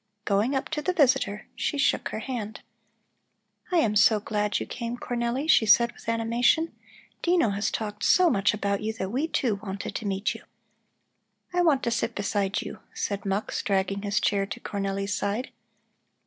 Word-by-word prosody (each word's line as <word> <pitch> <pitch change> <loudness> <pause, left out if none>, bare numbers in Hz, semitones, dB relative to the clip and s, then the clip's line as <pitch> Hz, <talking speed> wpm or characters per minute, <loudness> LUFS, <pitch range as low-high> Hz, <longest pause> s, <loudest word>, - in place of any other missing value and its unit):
Going 210 +7 +1
up 270 - -1
to 315 -1 -2
the 365 +4 0
visitor, 260 - +2
she 290 - -1
shook 280 - +1
her - - -4
hand. 220 -4 -5 1.1
"I 360 - +3
am 220 -9 +2
so 210 +1 +5
glad 210 -1 -1
you - - -4
came, 235 0 -5
Cornelli," 245 +4 -2
she 225 -8 +5
said 235 +3 +6
with - - -9
animation. 235 +8 +2 0.5
"Dino 345 - +3
has 200 +1 0
talked 210 0 -4
so 365 -1 +5
much 205 - +3
about 200 -1 -1
you 220 +1 -2
that 190 -3 -4
we, 275 +7 0
too, 230 -10 0
wanted 200 -1 -5
to 215 - -4
meet 195 +1 0
you." - - -10 1.1
"I 355 - +3
want 300 -6 +3
to 235 - 0
sit 230 0 -1
beside 200 -1 -1
you," - - -8 0.2
said 200 -1 -3
Mux, 195 +2 -1
dragging 195 0 0
his 200 -1 0
chair 200 -1 +1
to - - -6
Cornelli's 195 0 -2
side. 205 +6 -2
215 Hz, 175 wpm, -26 LUFS, 200-250 Hz, 1.1 s, said